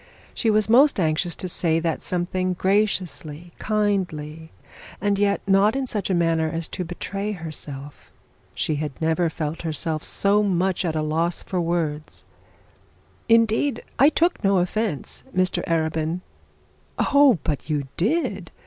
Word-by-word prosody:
She 225 Hz, -, 0 dB
was 215 Hz, -1 st, +3 dB
most 265 Hz, +2 st, +5 dB
anxious 165 Hz, +1 st, 0 dB
to 185 Hz, -, -4 dB
say 165 Hz, -2 st, +2 dB
that 165 Hz, -1 st, -2 dB
something 185 Hz, +1 st, -1 dB
graciously, 180 Hz, -4 st, -1 dB
kindly, 175 Hz, -7 st, -1 dB, 0.5 s
and 200 Hz, 0 st, 0 dB
yet 200 Hz, -1 st, +2 dB
not 200 Hz, +3 st, +4 dB
in 270 Hz, -1 st, -1 dB
such 210 Hz, -6 st, -2 dB
a 190 Hz, -, +2 dB
manner 165 Hz, -2 st, +1 dB
as 165 Hz, +1 st, -4 dB
to 180 Hz, -, -4 dB
betray 195 Hz, +4 st, -4 dB
herself. 145 Hz, -5 st, -7 dB, 0.4 s
She 155 Hz, -, 0 dB
had 150 Hz, -3 st, -5 dB
never 160 Hz, +1 st, +1 dB
felt 160 Hz, -1 st, -4 dB
herself 160 Hz, -1 st, -2 dB
so 205 Hz, +1 st, +2 dB
much 190 Hz, -2 st, +1 dB
at 160 Hz, -2 st, -1 dB
a 155 Hz, -, 0 dB
loss 165 Hz, +3 st, -1 dB
for 185 Hz, -2 st, -2 dB
words. 165 Hz, -3 st, -3 dB, 1.1 s
'Indeed 230 Hz, +4 st, +3 dB, 0.2 s
I 280 Hz, -, +7 dB
took 340 Hz, -3 st, +1 dB
no 195 Hz, -1 st, +3 dB
offence, 180 Hz, -2 st, -2 dB
Mr 185 Hz, 0 st, +1 dB
Arabin.' 160 Hz, +1 st, -1 dB, 0.8 s
'Oh, 280 Hz, -6 st, +5 dB
but 150 Hz, 0 st, -3 dB
you 150 Hz, -2 st, 0 dB
did! 200 Hz, -, -1 dB
175 Hz, 140 wpm, -23 LUFS, 160-205 Hz, 1.1 s, I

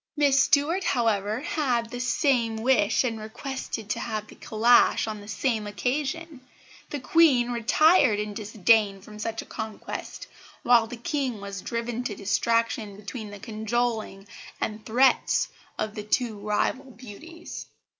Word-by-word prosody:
"Miss 285 Hz, -1 st, +4 dB
Stuart, 305 Hz, +6 st, +2 dB
however, 220 Hz, -, 0 dB
had 245 Hz, -7 st, -1 dB
the 245 Hz, -, -5 dB
same 245 Hz, -2 st, +1 dB
wish 220 Hz, -2 st, +2 dB
and 230 Hz, -3 st, -2 dB
requested 225 Hz, 0 st, -6 dB
to -, -, -1 dB
have 215 Hz, -2 st, -3 dB
the -, -, -14 dB
calash 230 Hz, +3 st, +3 dB
on 215 Hz, -2 st, -5 dB
the 205 Hz, -, -12 dB
same 215 Hz, +1 st, -1 dB
occasion. 280 Hz, +7 st, -3 dB, 0.5 s
The 290 Hz, -, -4 dB
Queen 255 Hz, -4 st, +4 dB
retired 245 Hz, -, +4 dB
in 210 Hz, 0 st, -3 dB
disdain 210 Hz, -1 st, +2 dB
from 210 Hz, +2 st, -12 dB
such 225 Hz, +1 st, -3 dB
a -, -, -18 dB
contest, 220 Hz, -1 st, -6 dB, 0.4 s
while 235 Hz, -2 st, +5 dB
the 245 Hz, -, -8 dB
King 255 Hz, -2 st, -2 dB
was 200 Hz, -1 st, -6 dB
driven 235 Hz, +1 st, -3 dB
to 210 Hz, -, -3 dB
distraction 220 Hz, +1 st, 0 dB
between 210 Hz, +1 st, -7 dB
the 205 Hz, -, -9 dB
cajoling 220 Hz, -1 st, -2 dB, 0.3 s
and 215 Hz, 0 st, -3 dB
threats 255 Hz, +4 st, +3 dB, 0.3 s
of 215 Hz, -1 st, -2 dB
the 215 Hz, -, -5 dB
two 225 Hz, +1 st, 0 dB
rival 210 Hz, +6 st, -1 dB
beauties." 260 Hz, +8 st, -10 dB
230 Hz, 145 wpm, -26 LUFS, 215-260 Hz, 0.5 s, while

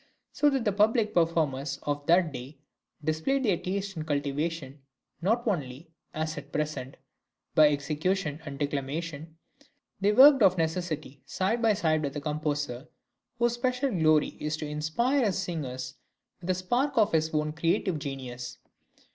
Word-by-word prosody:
So 295 Hz, -, +3 dB
that 270 Hz, -4 st, -1 dB
the 210 Hz, -, +3 dB
public 215 Hz, +2 st, +2 dB
performers 150 Hz, -5 st, +1 dB
of 145 Hz, 0 st, -3 dB
that 170 Hz, -1 st, +4 dB
day 135 Hz, +4 st, -8 dB, 0.5 s
displayed 160 Hz, -, 0 dB
their 205 Hz, -7 st, +3 dB
taste 195 Hz, +2 st, -3 dB
and 155 Hz, -1 st, -5 dB
cultivation 145 Hz, 0 st, -2 dB, 0.4 s
not 230 Hz, +7 st, +1 dB
only, 150 Hz, -, -3 dB, 0.2 s
as 155 Hz, 0 st, -3 dB
at -, -, -14 dB
present, 150 Hz, -3 st, -3 dB, 0.6 s
by 155 Hz, -1 st, +7 dB
execution 150 Hz, +3 st, -1 dB
and 145 Hz, -3 st, -7 dB
declamation; 150 Hz, +3 st, -4 dB, 0.6 s
they 200 Hz, +1 st, +3 dB
worked 270 Hz, +4 st, +8 dB
of 185 Hz, -3 st, +5 dB
necessity 160 Hz, -4 st, -2 dB
side 220 Hz, +5 st, 0 dB
by 225 Hz, -2 st, +4 dB
side 160 Hz, -6 st, +1 dB
with 140 Hz, -1 st, -3 dB
the -, -, -2 dB
composer, 150 Hz, -3 st, -3 dB, 0.5 s
whose 240 Hz, 0 st, +2 dB
special 255 Hz, +2 st, 0 dB
glory 155 Hz, -5 st, +3 dB
it -, -, -5 dB
was 150 Hz, 0 st, -1 dB
to 155 Hz, -, -4 dB
inspire 160 Hz, -, 0 dB
his 200 Hz, -4 st, +1 dB
singers 130 Hz, -9 st, -4 dB, 0.5 s
with 180 Hz, -, -7 dB
a 185 Hz, -, +3 dB
spark 240 Hz, +11 st, 0 dB
of 215 Hz, -2 st, +4 dB
his 160 Hz, -1 st, +2 dB
own 150 Hz, 0 st, 0 dB
creative 165 Hz, +1 st, 0 dB
genius. 125 Hz, -3 st, -6 dB
160 Hz, 155 wpm, -28 LUFS, 145-195 Hz, 0.6 s, worked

